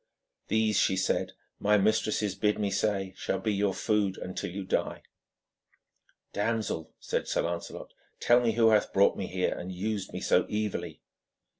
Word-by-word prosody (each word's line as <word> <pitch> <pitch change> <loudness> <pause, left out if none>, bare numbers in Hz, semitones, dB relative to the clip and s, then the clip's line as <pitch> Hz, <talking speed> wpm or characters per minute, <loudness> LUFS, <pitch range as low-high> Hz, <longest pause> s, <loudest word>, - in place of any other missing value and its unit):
'These,' 110 -1 +2
she 95 - +2
said, 95 - 0 0.3
'my 105 +1 +4
mistresses 105 -1 +1
bid 105 +1 +1
me 105 -2 -1
say 95 -3 0
shall - - -2
be 110 - -1
your 100 0 +1
food 105 -1 0
until 90 0 -5
you 95 +3 -5
die.' 95 - -2 1.3
'Damsel,' 105 -6 -2
said - - -2
Lancelot, 85 0 -3 0.3
'tell 120 +1 +5
me 115 -2 +1
who 115 0 +5
hath 105 -1 +2
brought 100 +1 +4
me 95 - -4
here 90 0 0
and 90 +1 -6
used 100 +2 -3
me - - -5
so - - +3
evilly.' 105 -1 -3
105 Hz, 155 wpm, -29 LUFS, 95-110 Hz, 1.3 s, tell